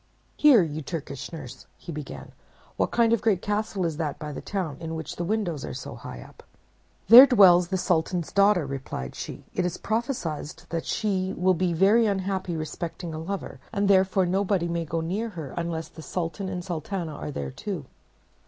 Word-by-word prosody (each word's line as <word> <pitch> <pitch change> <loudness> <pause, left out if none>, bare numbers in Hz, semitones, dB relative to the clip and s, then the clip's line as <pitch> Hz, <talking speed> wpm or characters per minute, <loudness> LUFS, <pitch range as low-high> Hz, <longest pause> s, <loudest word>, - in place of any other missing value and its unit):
"Here, 275 -10 +6
you 155 -1 -4
Turkish 140 -3 -6
nurse," 145 -7 -9
he - - -9
began, 150 -3 -7 0.4
"what - - +1
kind 230 -1 +3
of 230 - +3
a - - -18
great 210 -5 +2
castle 205 -2 -1
is 160 -3 -2
that 155 -3 -2
close 150 - -6
by - - -6
the - - -6
town, 180 -9 -3
in 165 0 -5
which 160 -1 -5
the 175 - -3
windows 180 -6 -1
are 65 - -5
so - - -7
high - - -9
up?" - - -14 0.7
"There 245 +6 +12
dwells 180 -7 +6
the 190 +1 -1
Sultan's 175 -1 0
daughter," 200 -4 +4
replied 135 - -5
she. - - -7
"It 185 - 0
is 180 -2 -2
prophesied 220 - -2 0.2
that 165 -1 -3
she 190 -3 -1
will 185 +1 +3
be 180 0 0
very 205 +7 +4
unhappy 190 -3 -1
respecting 165 +2 -5
a 155 - -5
lover; 195 +4 -5
and 200 -2 0
therefore 190 -1 +4
nobody 190 -1 +1
may 170 -1 -2
go 165 +1 -2
near 200 +8 -2
her, 160 -9 -7
unless 170 -2 -3
the 160 - -12
Sultan 170 +3 -3
and 180 -1 -4
Sultana 170 -1 -4
are 145 - -6
there 70 - -4
too." - - -5
175 Hz, 195 wpm, -26 LUFS, 160-200 Hz, 0.7 s, There